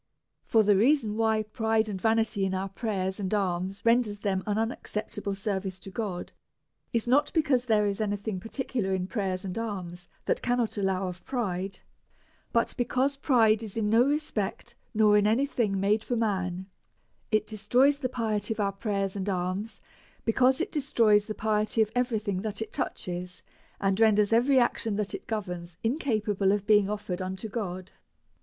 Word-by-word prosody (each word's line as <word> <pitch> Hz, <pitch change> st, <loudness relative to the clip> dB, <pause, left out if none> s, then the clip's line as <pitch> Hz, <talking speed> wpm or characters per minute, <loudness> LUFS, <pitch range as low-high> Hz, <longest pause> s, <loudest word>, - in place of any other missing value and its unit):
For 225 Hz, -2 st, +4 dB
the 205 Hz, -1 st, +4 dB
reason 225 Hz, 0 st, +3 dB
why 220 Hz, -1 st, +2 dB
pride 220 Hz, 0 st, 0 dB
and 195 Hz, -3 st, -5 dB
vanity 220 Hz, -3 st, +2 dB
in 190 Hz, 0 st, 0 dB
our 190 Hz, +1 st, -2 dB
prayers 195 Hz, -2 st, -2 dB
and 190 Hz, -2 st, -2 dB
alms 190 Hz, 0 st, -2 dB
render 230 Hz, -1 st, +4 dB
them 200 Hz, -2 st, -1 dB
an 205 Hz, 0 st, 0 dB
unacceptable 210 Hz, -2 st, -3 dB
service 195 Hz, -2 st, -3 dB
to 195 Hz, 0 st, -11 dB
God, 190 Hz, -4 st, -4 dB, 0.6 s
is 230 Hz, 0 st, 0 dB
not 285 Hz, +4 st, +3 dB
because 285 Hz, -6 st, +2 dB
there 215 Hz, -3 st, +3 dB
is 200 Hz, +1 st, -1 dB
any 205 Hz, -1 st, 0 dB
thing 200 Hz, -2 st, -4 dB
particular 225 Hz, -3 st, -2 dB
in 180 Hz, -1 st, -2 dB
prayers 190 Hz, -3 st, -2 dB
and 185 Hz, -, -4 dB
alms 180 Hz, -6 st, -5 dB, 0.2 s
that -, -, 0 dB
cannot 245 Hz, -2 st, 0 dB
allow 195 Hz, -2 st, 0 dB
of 180 Hz, 0 st, -7 dB
pride, 195 Hz, -6 st, -3 dB, 0.7 s
but 230 Hz, -, +2 dB
because 255 Hz, +3 st, +1 dB
pride 230 Hz, -6 st, +3 dB
is 220 Hz, -1 st, -6 dB
in 210 Hz, -2 st, +1 dB
no 225 Hz, +2 st, +6 dB
respect 250 Hz, -6 st, -2 dB, 0.2 s
nor 210 Hz, -1 st, +5 dB
in 205 Hz, -, +2 dB
any 235 Hz, +6 st, +3 dB
thing 215 Hz, -8 st, 0 dB
made 210 Hz, +3 st, +2 dB
for 245 Hz, -, -2 dB
man; 190 Hz, -5 st, -1 dB, 0.6 s
it 215 Hz, -2 st, +2 dB
destroys 245 Hz, +7 st, +2 dB
the 255 Hz, -3 st, -1 dB
piety 220 Hz, -4 st, -2 dB
of -, -, -13 dB
our 200 Hz, -1 st, +1 dB
prayers 195 Hz, -1 st, -2 dB
and 200 Hz, 0 st, -2 dB
alms, 185 Hz, +4 st, -3 dB, 0.4 s
because 255 Hz, +3 st, +3 dB
it -, -, -2 dB
destroys 225 Hz, -8 st, +3 dB
the 215 Hz, -, -4 dB
piety 215 Hz, 0 st, 0 dB
of 215 Hz, -1 st, +3 dB
every 245 Hz, -1 st, +1 dB
thing 200 Hz, -3 st, -2 dB
that 210 Hz, -1 st, -3 dB
it 220 Hz, -, -5 dB
touches, 180 Hz, 0 st, -4 dB, 0.4 s
and 195 Hz, 0 st, +1 dB
renders 215 Hz, -1 st, +4 dB
every 255 Hz, +4 st, +4 dB
action 230 Hz, -3 st, +1 dB
that 205 Hz, -1 st, -2 dB
it -, -, -7 dB
governs 180 Hz, -6 st, -4 dB
incapable 215 Hz, -, +1 dB
of 205 Hz, -1 st, 0 dB
be 210 Hz, -1 st, +6 dB
ing 200 Hz, -1 st, -2 dB
offered 205 Hz, -3 st, -3 dB
unto 190 Hz, +3 st, -4 dB
God. 185 Hz, -4 st, -5 dB
210 Hz, 175 wpm, -28 LUFS, 195-230 Hz, 0.7 s, no